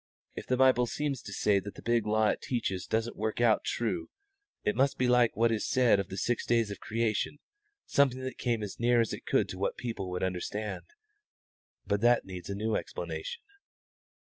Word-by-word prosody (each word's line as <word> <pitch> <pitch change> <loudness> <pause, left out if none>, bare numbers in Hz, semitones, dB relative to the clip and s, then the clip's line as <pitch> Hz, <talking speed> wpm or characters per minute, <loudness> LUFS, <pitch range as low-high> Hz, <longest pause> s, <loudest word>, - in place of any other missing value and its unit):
If - - -7
the 125 - +1
Bible 130 -2 +4
seems 140 0 -2
to 105 - -9
say 100 0 +2
the 100 +1 -7
big 115 -2 +1
law 110 0 +3
it - - -1
teaches 100 -7 -2
doesn't 115 +1 -1
work 110 +1 -2
out 120 -2 +4
true, 120 - -2 0.5
it 105 - +1
must 135 +3 +2
be 125 - +2
like 125 -2 +4
what 115 +1 +3
is 110 -2 -1
said 125 -6 +4
of 100 -1 -3
the 95 - -6
six 120 +2 0
days 115 -3 +1
of 100 - -6
creation, 115 +4 -1 0.5
something 130 -2 +2
that 130 - -5
came 115 -3 0
as 100 - -6
near 120 +1 +4
as 115 - +1
it - - -8
could - - +2
to 95 - -6
what 100 - -1
people 115 -6 -4
would 90 0 -3
understand, 95 +3 -3 1.0
but 100 0 0
that 120 +1 +4
needs 90 -2 -8
a 100 - -2
new 110 +2 -1
explanation." 470 -3 -5
115 Hz, 195 wpm, -30 LUFS, 105-125 Hz, 1.0 s, Bible